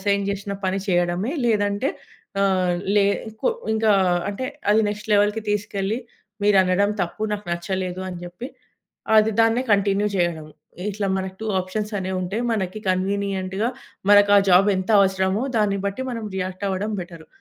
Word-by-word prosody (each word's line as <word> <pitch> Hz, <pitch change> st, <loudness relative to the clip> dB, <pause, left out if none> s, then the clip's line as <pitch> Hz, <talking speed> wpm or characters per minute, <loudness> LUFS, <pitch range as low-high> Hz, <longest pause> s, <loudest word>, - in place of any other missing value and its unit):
Assign 200 Hz, 0 st, +1 dB
జేషిన 200 Hz, 0 st, -3 dB
పని 190 Hz, +1 st, 0 dB
జెయడమే, 175 Hz, +6 st, +1 dB
లేదంటే 205 Hz, +4 st, +1 dB, 0.5 s
ఆహ్, 185 Hz, -2 st, +2 dB, 0.2 s
లే 200 Hz, -, +5 dB, 0.4 s
కొ -, -, +3 dB, 0.3 s
ఇంకా 220 Hz, -1 st, +3 dB, 0.4 s
అంటే, 205 Hz, +6 st, -5 dB, 0.3 s
అది 220 Hz, -, +4 dB
నెక్స్ట్ 210 Hz, +1 st, -7 dB
లెవెల్‌కి 205 Hz, +2 st, +2 dB
తీసుకెళ్ళి, 205 Hz, +1 st, -1 dB, 0.5 s
"మీరనడం 200 Hz, 0 st, +3 dB
తప్పు, 180 Hz, +5 st, -5 dB
నాకు 205 Hz, -2 st, -8 dB
నచ్చలేదు" 185 Hz, +1 st, -3 dB
అని 180 Hz, -, -7 dB
జెప్పి, 180 Hz, +9 st, -8 dB, 0.7 s
అది 215 Hz, +1 st, +4 dB
దాన్నే 225 Hz, +3 st, +2 dB
కంటిన్యూ 200 Hz, +1 st, +1 dB
జెయ్యడం. 170 Hz, -4 st, -1 dB, 0.4 s
ఇట్లా 205 Hz, 0 st, -2 dB
మనకు 190 Hz, 0 st, -4 dB
2 220 Hz, -, -4 dB
ఆప్షన్సనేవుంటయి. 190 Hz, 0 st, -3 dB
మనకి 200 Hz, -2 st, -2 dB
కన్వీనియంట్‌గా, 195 Hz, +2 st, -1 dB, 0.4 s
మనకా 205 Hz, 0 st, +7 dB
జాబెంత 190 Hz, +2 st, +4 dB
అవసరమో, 190 Hz, +2 st, +1 dB
దాన్ని 205 Hz, -2 st, +2 dB
బట్టి 200 Hz, +6 st, -3 dB
మనం 230 Hz, -2 st, -4 dB
రియాక్టవ్వడం 190 Hz, +2 st, -2 dB
బెటరు. 170 Hz, -2 st, -10 dB
200 Hz, 130 wpm, -23 LUFS, 185-210 Hz, 0.7 s, మనకా